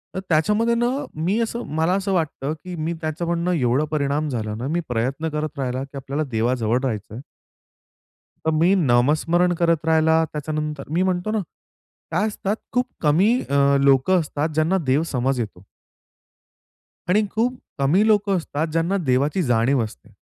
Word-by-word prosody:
तर - - -1
त्याच्यामध्ये 210 +9 +2
ना, 240 +1 +1 0.3
मी 180 +8 0
असं 235 +1 -2
मला 165 +3 +2
असं 195 0 -1
वाटतं, 155 -3 -1
की 180 -1 -6
मी 160 +1 -2
त्याचं 155 +2 -3
म्हणणं 170 +1 0
एवढा 130 0 +1
परिणाम 145 0 0
झाला 110 -4 -3
ना, 125 +4 -4
मी 170 +3 0
प्रयत्न 130 +7 -1
करत 150 -1 -4
राहिला 130 0 -2
की 140 0 -10
आपल्याला 140 +3 -3
देवाजवळ 115 +1 +1
राहायचंय 110 -4 -3
आहे. - - -7 1.2
तर 160 - +3
मी 185 +3 +5
नामस्मरण 160 +4 +2
करत 165 -2 +2
राहिला, 160 0 +4
त्याच्यानंतर 150 -1 -4
मी 175 +3 +2
म्हणतो 185 +3 -1
ना, 220 - 0 0.7
काय 195 +7 +1
असतात 205 0 -2 0.2
खूप 250 0 +2 0.2
कमी 170 +8 +4 0.2
अ, 140 0 +3
लोकं 140 +7 +4
असतात, 150 0 -2
ज्यांना 160 +5 +2
देव 140 +5 +3
समज 130 +1 0
येतो. 100 -5 -5 1.5
आणि 210 +3 +3
खूप 235 +4 +1 0.3
कमी 170 +10 +3
लोकं 205 -3 +3
असतात 160 -1 -2
ज्यांना 165 +5 +1
देवाची 140 +8 +2
जाणीव 120 0 +2
असते 105 - -9
155 Hz, 160 wpm, -22 LUFS, 135-180 Hz, 1.5 s, मी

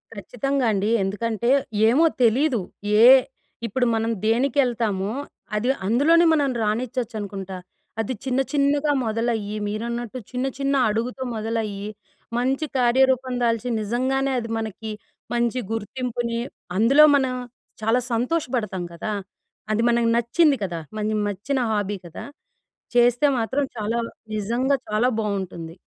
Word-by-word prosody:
ఖచ్చితంగా 255 +6 -2
అండి. 205 0 0
ఎందుకంటే 225 +4 -1 0.4
ఏమో 290 +8 +4 0.2
తెలీదు. 245 0 +3 0.4
ఏ - - +9 0.6
ఇప్పుడు 245 +4 0
మనం 225 +1 0
దేనికెళ్తామో 230 -4 +1 0.4
అది 220 +4 0 0.2
అందులోనే 295 - +4
మనం 285 -3 +2
రాణిచ్చొచ్చు 235 +2 -2
అనుకుంటా. 195 -2 -6 0.4
అది 225 +3 -1
చిన్న, 260 0 0
చిన్నగా 290 +1 +2
మొదలయ్యి 220 -2 -1
మీరన్నట్టు 235 +3 -4
చిన్న, 250 +1 -2
చిన్న 275 0 +1
అడుగుతో 235 +5 -2
మొదలయ్యి 215 -2 -3 0.5
మంచి 265 +5 0
కార్యరూపం 260 +1 +3
దాల్చి 230 0 +1
నిజంగానే 260 +5 0
అది 230 -1 -6
మనకి 220 0 -5 0.4
మంచి 240 +1 +1
గుర్తింపుని 235 +1 -3 0.4
అందులో 265 +8 +6
మనం 265 -2 +1 0.5
చాలా 225 +3 +2
సంతోషపడతాం 240 - -1
కదా! 190 +5 -4 0.6
అది 215 +1 +1
మనకు 235 -1 +2
నచ్చింది 275 +5 +3
కదా! 175 -3 -3 0.2
మన 210 - -2 0.2
మెచ్చిన 220 +8 -2
హాబీ 205 -1 -1
కదా! 165 - -9 0.7
చేస్తే 245 +3 +4
మాత్రం 260 +5 0
చాలా 225 +2 -1 0.4
నిజంగా 235 +7 +1
చాలా 215 +4 +2
బావుంటుంది. 185 -6 -4
235 Hz, 115 wpm, -23 LUFS, 215-260 Hz, 0.7 s, ఏ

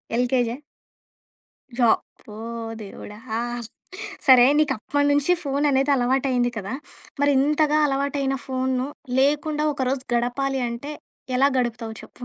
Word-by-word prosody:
ఎల్‌కేజియా? 245 -1 +1 1.2
జ - - -7 0.4
ప్పో! 210 - -13 0.5
దేవుడా! 210 +1 -9 0.2
ఆహ్, 240 0 -3 0.6
సరే 255 -2 +8
నీకు 300 -3 +3
అప్పటినుంచి 285 +5 +2
ఫోను 285 +1 0
అనేది 270 +1 +2
అలవాటయింది 250 -1 +1
కదా! 200 +1 -4 0.5
మరి 285 0 +4
ఇంతగా 300 +1 +2
అలవాటైన 275 0 -1
ఫో‌‌నును 260 0 -1 0.3
లేకుండా 295 +2 +1
ఒకరోజు 260 -1 -1
గడపాలి 260 +3 0
అంటే 245 +6 -6 0.4
ఎలా 275 +2 +5
గడుపుతావు 235 -2 -2
చెప్పు? 245 - -12
265 Hz, 115 wpm, -23 LUFS, 245-285 Hz, 1.2 s, సరే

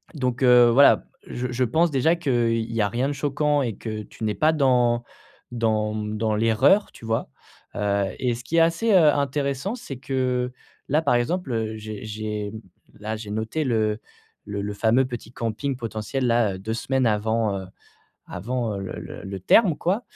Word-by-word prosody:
donc 125 -2 -1
heu, 125 -1 +7
voilà, 140 +4 +6 0.2
je 125 +1 -4
je 125 +1 0
pense 160 +9 +2
déjà 145 +5 +3
qu'il 115 -6 0
y 115 - +1
a 100 - +1
rien 120 +6 -1
de - - -2
choquant 145 +1 0
et 115 -5 -3
que 110 -2 -5
tu 110 - -11
n'es 105 -1 -1
pas 155 +1 +3
dans 125 -4 +2 0.5
dans, 110 -2 0
mmh, 105 0 -3
dans 110 -1 0
l'erreur, 115 - +3
tu 115 - -12
vois? 115 - -1 0.5
Heu 100 -1 0
et 125 -2 0
ce 120 - -9
qui 165 +7 -2
est - - +7
assez, 170 +8 +2
heu, 155 -5 +6
intéressant, 140 - -1
c'est 230 - -8
que, 125 -1 -1 0.4
là, 150 +3 +3
par 140 -6 +2
exemple, 120 -5 -1
j'ai 110 -1 -7
j'ai 105 -1 -4 0.5
là, 110 +1 -4
j'ai 105 -2 -8
noté 110 +9 -2
le 110 -3 0 0.5
le 100 0 -4
le 100 0 -4
fameux 115 +5 +2
petit 120 -2 -7
camping 125 +3 -3
potentiel, 115 +2 -3
là, 115 -5 +2
2 110 +4 -4
semaines 130 +2 0
avant, 110 -1 0
heu, 95 - -9 0.6
avant, 115 +2 -3
heu, 100 - -5
le 95 - -6
le - - -9
le 95 0 -5
terme, 175 - +4
quoi. 195 +8 0
120 Hz, 185 wpm, -24 LUFS, 110-135 Hz, 0.6 s, heu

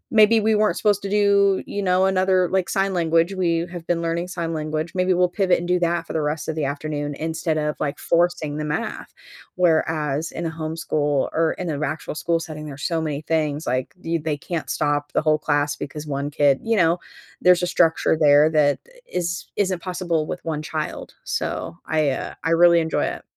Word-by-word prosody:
maybe 220 +1 +6
we 220 +1 +2
weren't 210 0 +2
supposed 205 -2 +2
to 200 - -4
do, 200 -1 +3
you 205 - -4
know, 185 0 +3
another 185 -1 +2
like, 190 -1 0
sign 195 -1 0
language, 165 +1 +2
we 170 -2 0
have 175 -2 -8
been 175 -1 +1
learning 170 +2 -1
sign 170 -2 -3
language. 155 +1 -3
Maybe 185 0 +1
we'll 180 0 +3
pivot 185 0 +2
and 175 - -5
do 180 0 +2
that 170 -1 0
for - - -7
the 160 - 0
rest 150 +1 -2
of 160 - -1
the 150 -3 -1
afternoon 145 0 -3
instead 160 0 -2
of, 150 0 -1
like, 145 -1 -2
forcing 170 -3 0
the 150 - -3
math. 150 - -4 0.4
Where 175 -3 +3
as 150 0 -2
in 170 - -5
a 160 - -2
homeschool 155 -3 -1
or 160 0 +1
in 180 -3 -3
an 145 +1 -3
actual 155 +2 -3
school 165 +2 0
setting, 155 -2 -7
there's 140 0 -8
so 165 -2 0
many 150 -2 -3
things 155 -1 -1
like 130 +5 -2
do 165 - -6
you 170 - +1
they 150 -1 -2
can't 165 +2 -5
stop 145 0 -1
the - - +2
whole 155 -1 +3
class 145 -1 0
because 150 +2 -7
1 140 0 -3
kid 145 -2 +3
you 225 -1 0
know, 170 0 +3 0.4
there's 180 0 +5
a 180 - +1
structure 165 -2 +2
there 150 0 +5
that 145 -2 +3
i - - -20
is 175 0 -2
isn't 185 -4 0
possible 175 -4 -2
with 180 - -6
1 155 -2 -2
child. 155 0 -5
So 85 - -3
I, 155 -3 +2
uh, - - -5
I 165 - 0
really 170 0 +6
enjoy 160 -1 0
it. - - -5
165 Hz, 215 wpm, -22 LUFS, 150-180 Hz, 0.4 s, maybe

